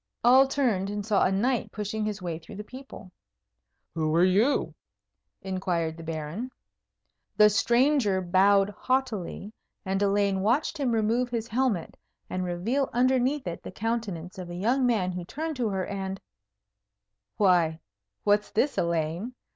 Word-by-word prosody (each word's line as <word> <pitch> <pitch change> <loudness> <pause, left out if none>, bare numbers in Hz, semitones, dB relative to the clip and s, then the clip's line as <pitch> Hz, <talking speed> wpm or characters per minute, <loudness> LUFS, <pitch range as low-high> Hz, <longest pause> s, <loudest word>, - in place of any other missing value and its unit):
All 260 +3 +7
turned 235 -9 0
and 205 -1 -4
saw 210 -2 +2
a - - +2
knight 235 +6 0
pushing 215 +1 -3
his 210 -3 -4
way 165 -2 -3
through 165 - -12
the 210 - -6
people. 255 -5 -11 0.8
"Who 155 -1 0
are 170 - +5
you?" 205 +10 +2 0.7
inquired 180 -4 -2
the 165 - -10
Baron. 165 +9 -4 0.9
The 210 -1 +7
stranger 240 -2 +3
bowed 195 +2 +3
haughtily; 220 -5 -2 0.3
and 195 +1 -1
Elaine 200 -1 +2
watched 245 +10 +1
him 265 -4 +1
remove 230 +3 +1
his 230 -2 -3
helmet, 235 -7 -1 0.3
and 185 0 -2
reveal 205 +11 -1
underneath 255 +3 +2
it 170 -2 -5
the - - -8
countenance 195 -5 -4
of 180 -1 -7
a 175 - -6
young 245 +8 +1
man 200 -7 +1
who 180 0 -5
turned 315 - -4
to 235 -3 0
her, 190 -2 -2
and 195 -1 -4 1.2
Why, 175 -5 +3 0.4
what's 205 0 +2
this, 275 +6 0
Elaine? 170 +7 -1
205 Hz, 145 wpm, -27 LUFS, 185-245 Hz, 1.2 s, All